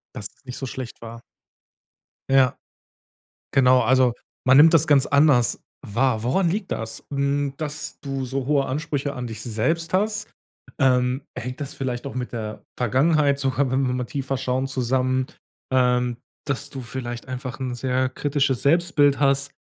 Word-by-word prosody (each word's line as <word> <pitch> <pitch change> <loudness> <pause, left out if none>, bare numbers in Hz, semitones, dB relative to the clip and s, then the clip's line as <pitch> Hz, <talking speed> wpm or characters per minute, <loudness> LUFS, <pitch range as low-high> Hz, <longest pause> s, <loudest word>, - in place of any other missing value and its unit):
Dass 105 - -5
es - - -33
nicht 125 -1 -7
so 135 - -4
schlecht 130 -1 -7
war? 115 0 -9 1.1
Ja. 135 0 +4 1.0
Genau. 130 -2 +5
Also, 125 +1 +4 0.3
man 130 +1 +6
nimmt 160 +3 +8
das 160 0 +5
ganz 140 -3 +4
anders 140 -4 +3 0.3
wahr. 115 +1 +1
Woran 165 +9 +2
liegt 200 +1 -2
das? 110 0 -4
Hm, 140 0 0
dass 150 -1 -5
du 135 -2 -3
so 135 0 -3
hohe 140 -2 +2
Ansprüche 145 0 -2
an 125 -2 -5
dich 110 -2 -7
selbst 130 +10 -1
hast? 210 +2 0 0.5
Ähm, 125 -1 +2
hängt 125 +4 -6
das 140 - -5
vielleicht 125 -2 -3
doch 140 - -6
mit 125 -1 -4
der 110 -2 -5
Vergangenheit 140 +4 +2
sogar, 135 -1 0
wenn 130 0 +1
wir 125 - 0
mal 125 - -2
tiefer 135 +2 -3
schauen, 130 +1 -1
zusammen, 130 0 0 0.5
ähm, 125 -1 +2 0.3
dass 140 0 -2
du 135 - -6
vielleicht 120 -1 -6
einfach 130 0 -5
'n 125 -2 -3
sehr 130 +1 0
kritisches 140 -1 0
Selbstbild 145 -2 +3
hast. 140 0 +2
130 Hz, 160 wpm, -23 LUFS, 125-140 Hz, 1.1 s, nimmt